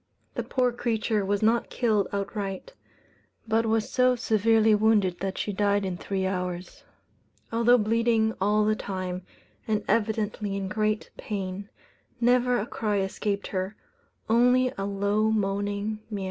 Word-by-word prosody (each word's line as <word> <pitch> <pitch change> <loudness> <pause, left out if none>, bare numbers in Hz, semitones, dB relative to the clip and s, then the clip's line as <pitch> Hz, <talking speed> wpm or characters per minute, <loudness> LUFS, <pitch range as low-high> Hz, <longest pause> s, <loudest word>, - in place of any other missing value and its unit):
The - - -2
poor 250 -1 +1
creature 225 -3 -1
was 200 +2 0
not 230 +2 +2
killed 215 -5 +1
outright; 200 - -4 0.7
but 225 +1 +2
was 220 -1 +1
so 255 -1 +3
severely 220 -1 +3
wounded 210 -4 +3
that 190 +1 -3
she 205 - -2
died 200 0 +1
in 185 -1 -2
three 190 +1 -3
hours. 180 -1 -4 0.7
Although 235 +2 +5
bleeding 225 0 +2
all 210 +2 +3
the 215 0 +2
time, 185 -3 -4 0.5
and 215 -1 0
evidently 210 -1 0
in 195 -1 -3
great 215 +1 -1
pain, 200 -1 -5 0.5
never 245 +1 +3
a 205 - -1
cry 215 -3 -2
escaped 200 +1 -2
her, 190 +2 -3 0.5
only 250 +3 +4
a 195 - -3
low 200 +2 +1
moaning 205 0 -1
mew. 210 -2 -4
210 Hz, 140 wpm, -27 LUFS, 195-225 Hz, 0.7 s, Although